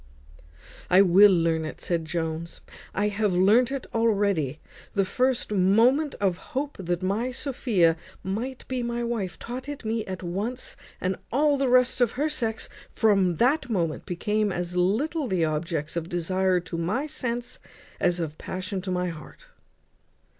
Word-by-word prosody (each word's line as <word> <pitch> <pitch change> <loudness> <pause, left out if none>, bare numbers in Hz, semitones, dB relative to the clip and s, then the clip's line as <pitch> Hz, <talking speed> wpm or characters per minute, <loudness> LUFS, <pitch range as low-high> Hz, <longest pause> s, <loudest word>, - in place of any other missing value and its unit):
"I 185 +2 +7
will 195 +3 +7
learn 165 -2 +2
it," 155 - -6
said 170 -2 -1
Jones. 165 0 -4 0.3
"I 205 +1 +1
have 205 -1 0
learnt 215 +8 +4
it 275 -2 -3
already. 200 - +1 0.4
The 195 -1 +3
first 255 +2 0
moment 230 +10 +3
of 190 -3 0 0.2
hope 290 +1 -2
that 175 -1 -2
my 210 +7 0
Sophia 240 - +1 0.3
might 235 +7 -4
be 255 -1 -2
my 235 0 -2
wife 215 -7 -3
taught 255 +4 -6
it 285 -5 -7
me 220 0 -1
at 185 -1 -5
once; 205 +9 -3 0.2
and 185 0 -1
all 290 +3 +3
the 275 -2 +1
rest 250 0 +3
of 240 - +3
her 295 +5 0
sex 225 -7 -2 0.3
from 195 -5 +3
that 255 - +2
moment 170 -8 -1
became 210 +4 0
as 175 0 -3
little 255 - +1
the 180 -6 +1
objects 155 0 -2
of 170 0 -3
desire 185 +2 +1
to 170 -1 -5
my 205 - -1
sense 240 -5 -4 0.4
as 175 0 +2
of 155 -2 -4
passion 185 +1 -4
to 190 - -6
my 180 0 0
heart." 155 -3 -11
200 Hz, 160 wpm, -26 LUFS, 175-240 Hz, 0.4 s, I